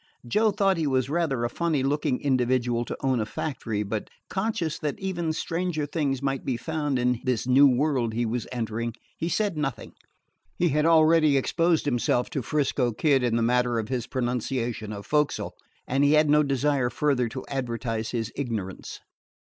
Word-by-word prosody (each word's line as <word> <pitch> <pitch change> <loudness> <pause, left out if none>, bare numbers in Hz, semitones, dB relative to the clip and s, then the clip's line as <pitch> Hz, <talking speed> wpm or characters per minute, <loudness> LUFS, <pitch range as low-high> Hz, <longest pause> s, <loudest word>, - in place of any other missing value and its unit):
Joe 215 - +3
thought 195 -2 +2
he 160 -2 0
was 130 -1 0
rather 155 -7 0
a - - +2
funny 160 -5 0
looking 140 -1 0
individual 125 -3 +1
to - - -5
own 130 -2 +1
a 110 - 0
factory; 110 -5 -3
but, 105 +1 -4 0.2
conscious 190 -6 -1
that 150 -2 -3
even 175 -4 -2
stranger 165 -1 -2
things 140 -3 -2
might 135 -1 -1
be 125 - -1
found 150 0 -2
in 125 -1 +1
this 125 -3 0
new 135 +3 +6
world 130 -4 +1
he 120 +1 0
was 115 +1 -2
entering, 115 -1 -3 0.2
he 165 - -1
said 200 -2 0
nothing. 135 -4 -3 0.6
He 175 - +2
had 150 +2 +2
already 160 -2 +5
exposed 165 +4 +1
himself 120 -2 +1
to 140 - -2
'Frisco 130 -2 0
Kid 140 +2 +2
in 120 -2 +1
the 115 - +1
matter 125 0 +2
of 110 0 -3
his 125 -3 -2
pronunciation 120 -3 -2
of 100 -1 -7
"fo'c'sle," 150 -1 0 0.4
and 135 +2 +1
he 145 +1 +4
had 155 -1 +4
no 150 0 +6
desire 140 -2 +1
further 130 -4 +1
to 130 +3 -7
advertise 115 -4 -3
his 115 -2 -3
ignorance. 110 -9 -5
135 Hz, 180 wpm, -26 LUFS, 120-150 Hz, 0.6 s, new